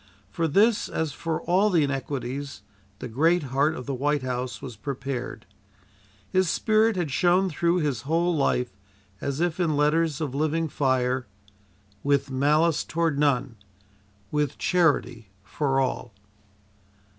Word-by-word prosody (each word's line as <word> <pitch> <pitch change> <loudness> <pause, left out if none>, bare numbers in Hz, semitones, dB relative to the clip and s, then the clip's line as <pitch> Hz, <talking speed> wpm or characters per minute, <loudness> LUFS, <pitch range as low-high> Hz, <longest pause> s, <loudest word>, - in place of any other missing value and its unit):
For 165 -1 0
this, 205 +8 +3
as 160 -3 -2
for 165 0 -3
all 190 +4 +3
the 170 -6 +3
inequities 140 0 -4 0.3
the 125 - -6
great 160 +9 +2
heart 145 +4 +2
of 125 - -7
the 140 - -3
White 145 +2 0
House 125 0 -3
was 125 -4 -8
prepared. 130 -1 -5 0.8
His 185 - +1
spirit 220 +3 +2
had 175 -6 -2
shone 180 +5 +3
through 170 +3 +1
his 140 -7 -1
whole 165 +5 +1
life 125 -4 +1 0.5
as 140 +1 -3
if 175 0 0
in 160 -5 +1
letters 150 0 +2
of 150 -5 -3
living 155 +3 0
fire: 130 -3 0 0.7
"With 140 -1 +1
malice 150 +4 +2
toward 165 -3 -1
none; 130 -5 +1 0.7
with 150 -2 -1
charity 125 - +1
for 135 +6 0
all." 125 -4 -2
145 Hz, 135 wpm, -25 LUFS, 130-165 Hz, 0.8 s, this